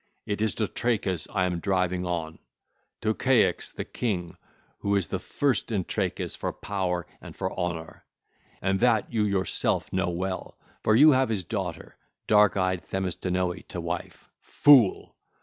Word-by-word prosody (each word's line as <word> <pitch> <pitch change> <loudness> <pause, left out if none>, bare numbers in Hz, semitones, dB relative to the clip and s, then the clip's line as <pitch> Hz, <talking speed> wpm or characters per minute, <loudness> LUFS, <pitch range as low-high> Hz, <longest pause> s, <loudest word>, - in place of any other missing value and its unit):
It 105 0 -3
is 110 -1 +1
to 110 - 0
Trachis 100 -8 -1
I 95 -3 +1
am 90 -2 -1
driving 90 -1 0
on, 80 -2 -3 0.6
to 110 0 +1
Ceyx 130 0 +2
the - - -5
king, 90 -8 -3 0.4
who 100 0 0
is 95 -5 +1
the - - -2
first 135 -5 -1
in 100 -4 0
Trachis - - -2
for - - -3
power 90 -3 -2 0.2
and - - -10
for 95 - -3
honour, 85 -3 -4 0.6
and 95 0 +1
that 120 -2 +2
you 110 -2 +2
yourself 95 -2 0
know 95 -1 +1
well, 95 +2 -4 0.3
for 110 - +4
you 150 +6 +8
have 130 -2 +3
his 105 -4 -1
daughter 90 -2 -5 0.3
dark 105 -1 +4
eyed 95 -2 +1
Themistinoe 90 -1 -2
to - - -6
wife. - - -5
Fool! 130 -9 +4
95 Hz, 155 wpm, -27 LUFS, 90-110 Hz, 0.6 s, you